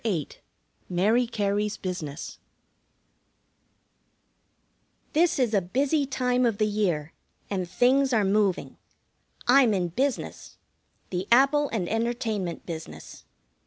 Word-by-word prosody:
VIII 180 -10 -1 0.6
MARY 215 +7 +2
CARY'S 210 -2 -1
BUSINESS 165 -5 -6 2.7
This 335 +3 +3
is 245 -5 +1
a 200 - +3
busy 275 - 0
time 250 -2 0
of 230 -4 +1
the 215 - +2
year, 180 -8 -1 0.4
and 185 -3 -2
things 265 +4 +3
are 220 -4 +2
moving. 200 -1 0 0.7
I'm 245 -4 +5
in 180 -2 -1
business. 265 +9 -3 0.5
The 185 +1 -3
Apple 275 +4 +4
and 195 -6 -2
Entertainment 225 -5 -2
business. 160 -2 -9
215 Hz, 105 wpm, -26 LUFS, 185-250 Hz, 2.7 s, I'm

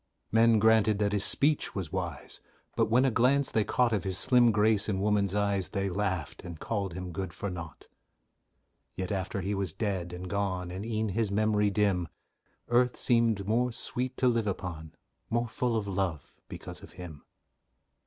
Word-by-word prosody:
Men 115 0 +5
granted 110 -1 +4
that 105 0 0
his 100 -2 +3
speech 150 +1 +4
was 90 -6 -4
wise, 90 -6 -5 0.3
But, - - +1
when 125 +4 +4
a 130 - +2
glance 130 +5 +2
they 110 - +2
caught 120 +2 +1
Of 100 -5 0
his 95 -2 -1
slim 125 -1 +4
grace 105 0 +2
and 95 -2 -1
woman's 100 -1 +1
eyes, 100 -2 0
They 100 0 -2
laughed, 95 -3 -3
and 85 -3 -8
called 100 -5 -3
him 90 -1 -6
good 95 0 -4
for 100 +3 -4
naught. 85 -5 -9 1.1
Yet 95 -1 -4
after 95 0 -2
he 100 +3 -2
was 95 -5 -2
dead 95 -4 -3
and 90 +1 -7
gone, 95 -2 -2
And 95 +2 -5
e'en 110 -1 -1
his 110 +2 -1
memory 105 0 +2
dim, 100 -4 +1 0.6
Earth 125 +1 +2
seemed 115 -5 +1
more 120 +3 +1
sweet 125 +2 -3
to 130 - +2
live 115 -3 +1
upon, 80 -5 -5 0.3
More 120 +1 0
full 120 +1 -1
of 105 -2 -3
love, 95 -5 -3
because - - -8
of - - -13
him. 85 -5 -10
100 Hz, 180 wpm, -29 LUFS, 95-115 Hz, 1.1 s, Men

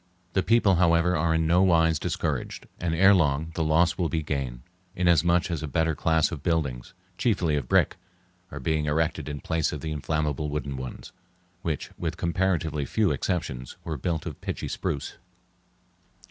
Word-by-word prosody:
The 95 - +3
people, 105 -4 +3
however, 85 0 +3
are 80 +1 +1
in 80 0 +1
no 85 +3 +4
wise 80 -4 +4
discouraged, 80 -6 -3
and 85 -1 -1
ere 95 +4 +6
long 80 -3 +1
the 80 - -1
loss 85 +2 +2
will 85 -3 +1
be 80 -2 -1
gain, 65 -5 -3 0.3
inasmuch 85 0 +3
as 80 - -2
a 80 - -3
better 80 +3 +1
class 80 +1 +2
of 80 -5 -5
buildings, 70 -8 -2 0.2
chiefly 90 -10 +1
of 70 -4 -2
brick, - - +3 0.5
are - - -7
being 80 -2 0
erected 75 0 0
in 75 -2 -5
place 80 -1 0
of 75 - -5
the 80 - -4
inflammable 75 -1 -1
wooden 70 -2 -3
ones, 65 -1 -7 0.5
which, 80 -6 -3
with - - -3
comparatively 85 -4 0
few 105 +7 +1
exceptions, 65 -9 -3
were 80 - -3
built 80 +3 -2
of - - -7
pitchy - - -4
spruce. 70 - -3
80 Hz, 170 wpm, -26 LUFS, 75-85 Hz, 0.5 s, ere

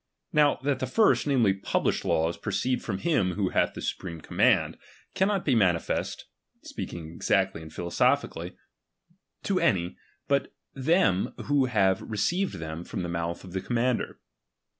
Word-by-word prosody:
Now, 150 -1 +5
that 140 -2 0
the 130 - -2
first, 210 - +3
namely, 120 -8 +3
published 95 - -1
laws, 80 +1 +1
proceed 130 0 -1
from 100 -4 -3
him 100 - +1
who 95 0 0
hath - - +1
the - - -6
supreme 85 -4 -4
command, - - +2 0.3
cannot 195 0 +1
be 140 - +3
manifest 90 -7 +1 0.4
(speaking 80 -2 -7
exactly 80 - +1
and 80 -1 -10
philosophically) 85 +2 0 0.9
to 195 -2 +1
any, 90 -3 +1 0.3
but 140 -1 0 0.2
them 135 - +2
who 145 -2 +3
have 95 -6 +2
received 175 - -1
them 80 +1 -6
from 90 - -5
the 85 - -3
mouth 85 0 -3
of 95 - -10
the 95 - -2
commander. 120 +2 -1
100 Hz, 145 wpm, -27 LUFS, 85-140 Hz, 0.9 s, Now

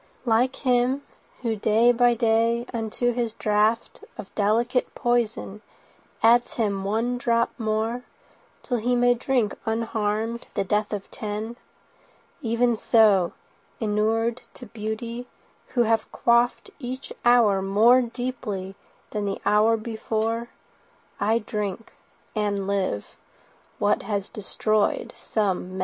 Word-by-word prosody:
Like 245 +3 +2
him 255 +1 +1 0.4
who 230 -2 0
day 220 +3 +4
by 245 0 +3
day 230 +1 +2
unto 230 +1 -1
his 235 -2 -2
draughtOf 215 0 -1
delicate 235 +5 +1
poison 230 -4 -1 0.6
adds 235 +2 +5
him 200 -4 -1
one 230 +5 -1
drop 235 -1 +1
moreTill 225 +2 -4
he 245 +2 +1
may 245 0 +4
drink 245 -3 0
unharmed 225 0 -2
the - - +1
death 210 +2 0
of 205 -2 -5
ten, 215 +2 -5 0.9
Even 235 +1 +2
so, 210 -6 +4 0.5
inured 225 +2 0
to 245 - -9
beauty, 230 +2 -5 0.5
who 240 - +5
have 225 -1 0
quaffedEach 245 +2 0
hour 230 -5 +5
more 220 +6 +5
deeply 235 -6 -4 0.4
than 210 -1 -2
the 195 -1 -2
hour 215 +2 +4
before,I 225 -1 -3
drink—and 210 -1 -4
live—what 200 - -3
has 200 -1 -3
destroyed 215 0 -1
some 190 -4 -2
men. - - -5
225 Hz, 105 wpm, -25 LUFS, 210-240 Hz, 0.9 s, adds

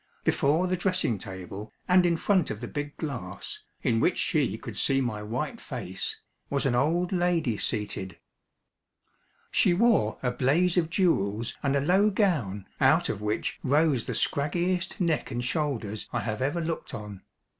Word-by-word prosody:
Before 155 +6 +2
the 185 0 +1
dressing 180 - 0
table, 95 +3 -7 0.2
and 180 -1 +5
in 170 -1 +2
front 185 -1 +2
of 105 - -4
the 120 - -5
big 145 +2 -5
glass, 120 - -5 0.2
in 115 -2 +2
which 175 - +2
she 135 - +1
could 115 -1 -8
see 135 +7 +2
my 120 -5 -2
white 125 - -3
face, 100 - -5 0.3
was 140 0 0
an 135 - +2
old 165 +8 +2
lady 175 - +1
seated. 100 -4 -3 1.3
She 175 - +4
wore 210 - +3
a 125 - +2
blaze 150 +9 +2
of 170 -3 +2
jewels 115 - +1
and 140 -1 +1
a 140 - +2
low 190 +8 +4
gown 150 - 0
out - - +4
of 100 - -3
which 105 +1 -2
rose 145 -2 +2
the - - -3
scraggiest 175 +5 0
neck 165 -5 0
and 120 +1 -3
shoulders 125 -8 -2
I 120 - -1
have 110 +2 -3
ever 145 +6 0
looked 165 0 -3
on. 105 -2 -8
140 Hz, 165 wpm, -28 LUFS, 110-175 Hz, 1.3 s, and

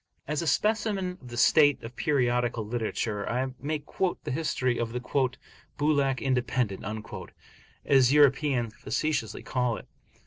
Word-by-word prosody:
As 150 +1 -1
a 165 - -3
specimen 200 +1 0
of 125 - -12
the 120 0 -8
state 145 +2 +5
of 115 +2 -8
periodical 120 -5 +1
literature, 110 -2 -2
I 130 +2 -1
may 155 +2 -1
quote 180 +5 -2
the - - -4
history 130 -4 0
of 115 -1 -2
the 125 - -2 0.8
"Bulak 140 -3 +2
Independent," 125 -5 0 1.0
as 135 -2 +5
Europeans 140 -5 +3
facetiously 150 -8 -2
call 125 -2 0
it. - - -11
130 Hz, 135 wpm, -28 LUFS, 120-150 Hz, 1.0 s, state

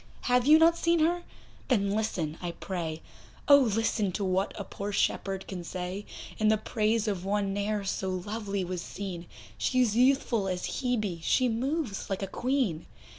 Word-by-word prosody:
Have 250 +1 +2
you 310 +1 +9
not 330 +1 +5
seen 335 0 +3
her? 345 +2 +2 0.5
then 200 -6 +2
listen 195 -8 -1
I 175 -1 -3
pray, 165 -4 -4 0.4
Oh! 285 -1 +9
listen 225 -4 +1
to 205 - -2
what 190 +1 +1
a - - -2
poor 200 +1 -5
shepherd 195 -1 -1
can 180 -2 -5
say 185 +3 -5 0.3
In 215 - +3
the 215 0 +4
praise 220 +1 0
of 195 -4 -1
one 200 0 0
ne'er 205 +1 -1
so 190 0 -2
lovely 200 +1 -3
was 180 -1 -4
seen; 180 -3 -6 0.3
She's 250 -5 +2
youthful 245 -4 +3
as 185 +6 -3
Hebe, 215 -9 -1
she 255 +9 +2
moves 250 -1 -2
like 195 0 -2
a - - +1
Queen. 240 - -1
205 Hz, 170 wpm, -29 LUFS, 190-245 Hz, 0.5 s, you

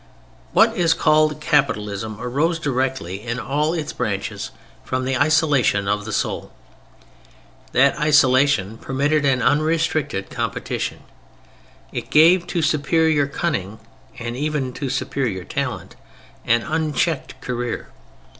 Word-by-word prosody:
What 225 0 +5
is 170 -5 +3
called 155 -1 +3
"Capitalism" 110 -8 0
arose 145 +8 0
directly 130 - -2
in 120 +1 -4
all 150 +7 0
its 155 -3 -4
branches - - -3 0.3
from 130 0 -2
the 135 0 0
isolation 145 -8 +2
of 105 0 0
the 110 - -5
soul. - - -2 1.2
That 135 +2 +4
isolation 130 -7 +3
permitted 145 +2 0
an 130 -2 +2
unrestricted 155 -9 0
competition. - - -3 0.9
It - - -5
gave 170 +3 +5
to 170 -3 -1
superior 155 -1 +2
cunning 120 - -3 0.4
and 120 0 -5
even 145 -2 -2
to 140 0 -4
superior 130 -7 -2
talent - - -4 0.5
an 115 0 +3
unchecked 155 -1 -1
career. 120 -1 -4
140 Hz, 115 wpm, -21 LUFS, 120-155 Hz, 1.2 s, What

